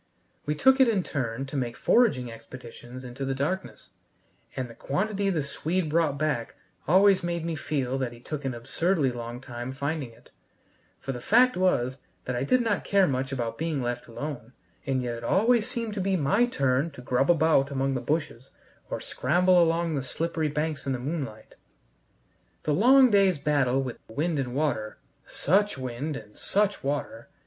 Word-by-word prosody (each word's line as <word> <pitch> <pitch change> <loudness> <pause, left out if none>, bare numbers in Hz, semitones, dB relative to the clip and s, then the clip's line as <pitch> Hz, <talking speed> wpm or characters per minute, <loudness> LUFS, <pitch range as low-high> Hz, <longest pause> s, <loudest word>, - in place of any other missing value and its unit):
We 150 - 0
took 265 - +4
it 265 - +7
in 205 -5 +1
turn 130 -4 -3
to 135 - -8
make 120 -3 -2
foraging 135 - +3
expeditions 120 +1 -11
into 125 +2 -6
the 135 0 -1
darkness, 170 +8 -3 0.6
and 130 -2 -3
the 115 - -12
quantity 200 - -1
the 165 -6 0
Swede 160 +4 -2
brought 160 -3 +2
back 140 -6 -1 0.3
always 190 +3 +5
made 170 -1 -2
me 170 - -2
feel 135 -1 -2
that 130 -3 -2
he 120 - -12
took 145 +4 -6
an 130 -2 -2
absurdly 140 +4 0
long 120 0 -6
time 120 -1 -6
finding 140 0 -3
it; 115 - -20 0.7
for 135 - -4
the 125 -2 -6
fact 250 - +4
was 135 -8 +1 0.3
I 125 0 -1
did 255 - +3
not 225 -4 0
care 200 -1 +3
much 130 0 -1
about 115 -4 -3
being 160 -3 -1
left 120 0 -3
alone, 125 -1 -6 0.3
and 130 -2 0
yet 120 -1 -3
it 115 - -9
always 225 - +3
seemed 235 -4 -3
to 200 - -2
be 190 +1 +1
my 200 - +3
turn 135 - +1
to 130 - -10
grub 125 +3 +1
about 160 -4 +4
among 135 -1 0
the 130 - -2
bushes 145 -2 -2 0.4
or - - -3
scramble 180 +6 +3
along 165 0 +1
the 140 - -1
slippery 160 +3 -2
banks 150 -1 -3
in 135 - +1
the - - -1
moonlight. 135 -6 -5 1.1
The 150 - +1
long 255 - +6
day's 195 -4 +4
battle 140 -2 +1
with 125 -3 -6
wind 150 +6 -1
and 125 -2 -3
water 135 -8 -1 0.3
such 200 +2 +1
wind 130 +4 -4
and 105 -1 -12
such 205 0 0
water! 140 -4 -3
145 Hz, 180 wpm, -27 LUFS, 125-175 Hz, 1.1 s, it